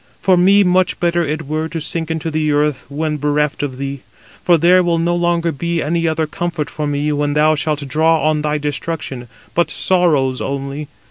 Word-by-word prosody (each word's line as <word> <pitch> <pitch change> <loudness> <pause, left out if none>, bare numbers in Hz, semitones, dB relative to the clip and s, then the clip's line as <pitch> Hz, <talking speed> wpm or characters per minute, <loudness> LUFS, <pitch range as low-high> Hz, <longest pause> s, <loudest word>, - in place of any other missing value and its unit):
For 190 -2 +3
me 195 +3 +5
much 180 0 +2
better 175 0 +1
it 155 0 -3
were 155 +2 -2
to 165 - -4
sink 160 +1 -3
into 160 0 -3
the 155 -1 0
earth, 145 -2 0
when 150 +1 -2
bereft 150 -1 0
of 135 -3 -4
thee; 140 0 -4 0.4
for 175 -2 +4
there 180 +3 +5
will 170 -2 +1
no 170 +1 +1
longer 170 -1 +1
be 170 +3 -2
any 165 +2 0
other 160 0 0
comfort 175 -2 -4
for 150 -1 -3
me 145 +1 -1
when 145 0 0
thou 155 +1 +4
shalt 150 -1 -2
draw 160 +3 +2
on 155 -1 +1
thy 150 0 0
destruction; 145 -3 -4 0.3
but 170 - +1
sorrows 150 -9 +1
only. 140 +2 -4
155 Hz, 195 wpm, -17 LUFS, 145-170 Hz, 0.4 s, me